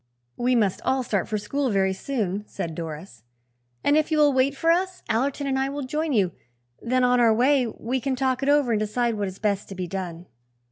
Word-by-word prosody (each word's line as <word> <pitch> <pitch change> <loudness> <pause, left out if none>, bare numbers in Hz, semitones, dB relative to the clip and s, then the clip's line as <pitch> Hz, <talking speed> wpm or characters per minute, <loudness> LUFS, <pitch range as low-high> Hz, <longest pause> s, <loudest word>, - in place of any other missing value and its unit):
"We 250 +1 +1
must 205 -5 +1
all 265 0 +1
start 205 -6 -1
for 215 - -1
school 265 +7 -1
very 190 -2 +2
soon," 205 -3 -2
said 165 - -5
Doris; 155 - -7 0.6
"and, 290 - +3
if 310 0 +2
you 310 - +2
will 295 -2 +5
wait 265 +2 +2
for 330 +3 +3
us, 370 +2 0
Allerton 270 +5 0
and 265 -1 0
I 270 0 0
will 285 0 -4
join 305 +4 -2
you. 200 -8 +2 0.5
Then, 255 +2 +1
on 250 0 +4
our 235 -2 +5
way, 255 +3 +3
we 240 +3 -3
can 270 0 -1
talk 260 0 0
it 275 - 0
over 290 -4 +3
and 215 - +2
decide 230 +3 0
what 205 -2 -2
is 190 0 -7
best 200 -1 -1
to 195 - -7
be 185 -1 -3
done." 175 -2 -5
245 Hz, 225 wpm, -25 LUFS, 200-275 Hz, 0.6 s, will